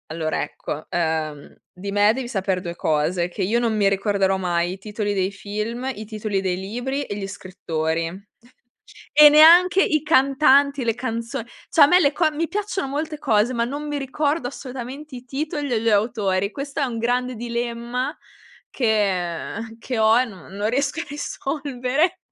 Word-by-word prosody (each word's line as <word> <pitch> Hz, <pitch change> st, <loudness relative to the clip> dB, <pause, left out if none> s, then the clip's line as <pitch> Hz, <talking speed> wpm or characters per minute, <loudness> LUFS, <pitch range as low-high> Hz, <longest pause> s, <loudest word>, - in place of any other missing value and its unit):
Allora, 155 Hz, 0 st, -2 dB
ecco, 150 Hz, +1 st, -6 dB
ehm, 160 Hz, -3 st, -2 dB, 0.2 s
di 195 Hz, +2 st, -7 dB
me 205 Hz, +1 st, +5 dB
devi 255 Hz, 0 st, -4 dB
sapere 195 Hz, -4 st, -1 dB
2 175 Hz, -1 st, -6 dB
cose, 170 Hz, +3 st, 0 dB
che 190 Hz, +2 st, -4 dB
io 220 Hz, +6 st, +1 dB
non 230 Hz, -2 st, 0 dB
mi 205 Hz, -1 st, +3 dB
ricorderò 195 Hz, -1 st, +1 dB
mai 175 Hz, -1 st, 0 dB
i -, -, -8 dB
titoli 205 Hz, +1 st, -3 dB
dei 190 Hz, -1 st, 0 dB
film, 215 Hz, +5 st, -4 dB
i 215 Hz, -, -7 dB
titoli 215 Hz, -2 st, -3 dB
dei 185 Hz, -2 st, -1 dB
libri 245 Hz, +9 st, -3 dB
e 205 Hz, -, -5 dB
gli 200 Hz, -1 st, -4 dB
scrittori, 165 Hz, -4 st, -3 dB, 1.1 s
e 300 Hz, 0 st, +9 dB
neanche 345 Hz, +6 st, +7 dB
i 305 Hz, -2 st, +1 dB
cantanti, 280 Hz, -2 st, +4 dB
le 230 Hz, -1 st, +1 dB
canzon 230 Hz, -1 st, -4 dB, 0.2 s
cioè 320 Hz, -, +4 dB
a -, -, +10 dB
me 360 Hz, +5 st, +5 dB
le 280 Hz, -4 st, +3 dB
co 315 Hz, +1 st, +2 dB
mi 320 Hz, +2 st, -2 dB
piacciono 400 Hz, -6 st, -3 dB
molte 300 Hz, +2 st, -3 dB
cose, 230 Hz, -4 st, +2 dB
ma 235 Hz, -1 st, 0 dB
non 285 Hz, +5 st, -5 dB
mi 295 Hz, -1 st, -2 dB
ricordo 285 Hz, 0 st, -1 dB
assolutamente 265 Hz, +2 st, -8 dB
i 245 Hz, -, -10 dB
titoli 290 Hz, +1 st, -3 dB
e 230 Hz, -3 st, +1 dB
gli 230 Hz, -, +2 dB
autori. 205 Hz, -3 st, +1 dB
Questo 280 Hz, +4 st, -5 dB
è -, -, +2 dB
un 245 Hz, -3 st, -3 dB
grande 250 Hz, +2 st, 0 dB
dilemma 240 Hz, +4 st, -3 dB, 0.5 s
che 200 Hz, -9 st, 0 dB
uhm, 225 Hz, 0 st, -8 dB
che 240 Hz, +1 st, -4 dB
ho 220 Hz, +1 st, +5 dB
e 255 Hz, -, +3 dB
non 195 Hz, -5 st, -12 dB
non 205 Hz, +2 st, -1 dB
riesco 280 Hz, +5 st, 0 dB
a -, -, -3 dB
risolvere. 285 Hz, +2 st, -1 dB
235 Hz, 175 wpm, -22 LUFS, 195-280 Hz, 1.1 s, a